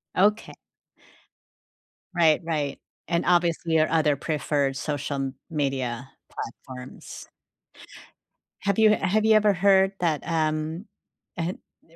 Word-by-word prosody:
Oka 210 +4 +2 1.6
Right, 160 -3 +4
right. 150 -4 -2 0.3
And, 170 0 0
obviously, 170 -2 +2
your 155 -1 +3
other 155 -2 +2
preferred 145 -2 -1
social 145 0 -3
m 135 -1 -3
media 135 -5 -2 0.2
platforms. 125 +2 -9 1.3
Have 200 -1 0
you 220 -1 +6
have 210 +3 +1
you 220 - +6
ever 210 -1 +4
heard 195 +1 +4
that, 160 -4 0
um, 160 +2 -1 0.5
eh, 170 +1 -1 0.3
he 165 - -23
160 Hz, 110 wpm, -25 LUFS, 145-180 Hz, 1.6 s, you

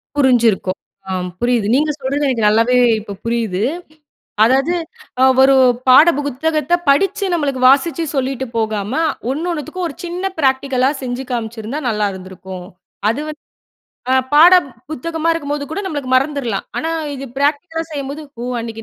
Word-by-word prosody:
புரிஞ்சிருக்கும். 235 -9 +2 0.3
ஆம் 180 -1 -2
புரியுது. 240 -4 +1
நீங்க 300 +3 +2
சொல்றது 280 +2 -1
எனக்கு 235 -5 0
நல்லாவே 230 +4 +3 0.2
இப்ப 205 -1 -8
புரியுது. 225 -5 -1 0.8
அதாவது 270 +8 +2 0.5
அ - - +7 0.2
ஒரு 270 0 +6 0.3
பாட 290 +6 +8
புத்தகத்த 300 +3 -1
படிச்சு 390 +8 +2
நம்மளுக்கு 280 -5 -1
வாசிச்சு 325 +5 +2
சொல்லிட்டு 265 -1 -2
போகாம, 215 -1 -2 0.4
ஒன்னொன்னுத்துக்கும் 335 +3 -3
ஒரு 280 - -9
சின்ன 360 +3 -3
பிராக்டிகலா 265 -1 +2
செஞ்சு 255 +1 -4
காமிச்சிருந்தா 230 +3 -4
நல்லா 210 -2 0
இருந்திருக்கும். 185 -1 -9 0.4
அது 260 +6 -2
வந்து 305 0 -8 0.7
அ - - +5 0.2
பாட 340 +5 +8 0.4
புத்தகமாக 325 +3 -1
இருக்கும்போது 290 -2 -3
கூட 400 - -2
நம்மளுக்கு 290 -7 -4
மறந்துர்லாம். 265 -5 0
ஆனா, 325 - -2 0.2
இது 275 0 -7
பிராக்டிகலா 310 +3 0
செய்யும்போது 285 +1 -5 0.2
"ஓ 245 - -4
அன்னக்கி 225 -1 -7
270 Hz, 135 wpm, -17 LUFS, 230-305 Hz, 0.8 s, பாட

